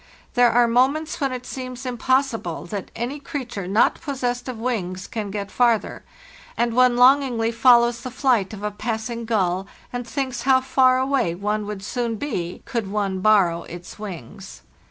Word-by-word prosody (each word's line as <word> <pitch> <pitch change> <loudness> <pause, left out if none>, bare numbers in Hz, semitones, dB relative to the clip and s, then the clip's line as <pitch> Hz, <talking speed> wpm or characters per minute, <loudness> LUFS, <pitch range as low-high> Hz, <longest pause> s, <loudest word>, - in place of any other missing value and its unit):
There 245 -1 +5
are 240 0 +4
moments 275 +8 +1
when 275 -1 +1
it 250 -1 -5
seems 255 0 -7
impossible 250 -7 0
that 200 +1 -5
any 245 +6 -3
creature 250 -9 -5
not 205 +4 +2
possessed 255 -4 -3
of 250 - -5
wings 200 -6 -3
can 215 -3 -5
get 200 0 -5
farther, 235 -3 +1 0.5
and 235 -1 +1
one 250 0 +4
longingly 250 -3 +4
follows 235 0 +4
the 255 - -5
flight 245 -6 +1
of 205 -2 -8
a 210 - -1
passing 225 +2 -4
gull, 190 -4 0 0.3
and 245 -1 -4
thinks 260 -3 -3
how 260 0 +4
far 260 -1 +3
away 260 -9 +1
one 210 +2 -2
would 205 -2 -6
soon 235 +2 -2
be 180 -9 -4
could 225 -5 -3
one 200 -2 -1
borrow 185 -5 +3
its 175 +4 -10
wings. 195 -1 -9
235 Hz, 165 wpm, -23 LUFS, 205-255 Hz, 0.5 s, There